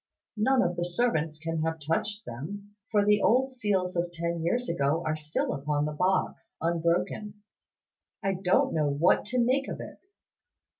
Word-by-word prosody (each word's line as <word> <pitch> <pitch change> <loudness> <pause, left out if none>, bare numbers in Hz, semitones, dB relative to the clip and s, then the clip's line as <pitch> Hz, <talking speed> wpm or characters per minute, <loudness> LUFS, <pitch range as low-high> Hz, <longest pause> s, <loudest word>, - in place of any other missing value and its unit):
None 255 +4 +3
of 175 0 -1
the 175 - 0
servants 175 -5 0
can 165 0 -3
have 160 0 -1
touched 205 +8 -2
them, 200 - -7
for 205 -2 +3
the 210 0 +4
old 260 +4 +3
seals 200 -7 -1
of 175 0 -1
ten 170 0 -3
years 240 +9 0
ago 160 0 +1
are 155 - 0
still 155 0 -2
upon 145 +1 -1
the 150 - -2
box, 185 +7 -1
unbroken. 175 +5 -1 0.8
I 195 0 +1
don't 185 0 +2
know 155 -2 +2
what 145 +5 +3
to 240 +5 -3
make 255 +3 +2
of - - -5
it." - - -9
175 Hz, 165 wpm, -28 LUFS, 160-210 Hz, 0.8 s, the